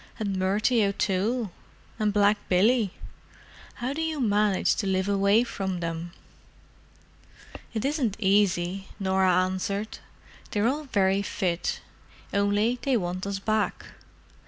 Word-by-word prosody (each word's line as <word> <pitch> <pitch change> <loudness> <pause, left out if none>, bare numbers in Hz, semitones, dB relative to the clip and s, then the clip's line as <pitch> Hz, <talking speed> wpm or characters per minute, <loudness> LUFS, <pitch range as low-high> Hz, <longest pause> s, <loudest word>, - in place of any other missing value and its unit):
and 200 -3 -2
Murty 210 +5 +2
O'Toole? 200 +3 0 0.5
and 210 -1 +2
Black 205 0 +3
Billy? 210 +3 +3 0.8
How 250 +3 -3
do 315 - -3
you 320 -2 -2
manage 210 -4 +2
to 200 - -1
live 190 0 0
away 200 +3 +3
from 190 -6 -3
them?" 165 0 -4 1.6
"It 220 +3 -1
isn't 275 -8 0
easy," 195 -2 +1
Norah 190 -1 +2
answered. 195 +3 -3 0.5
"They're 210 +2 +1
all 295 +4 -1
very 195 -5 +2
fit, 180 -3 -2 0.5
only 205 +4 +2
they 270 -3 +2
want 185 0 -3
us 200 -1 -2
back. 215 +2 -1
200 Hz, 120 wpm, -26 LUFS, 190-220 Hz, 1.6 s, Black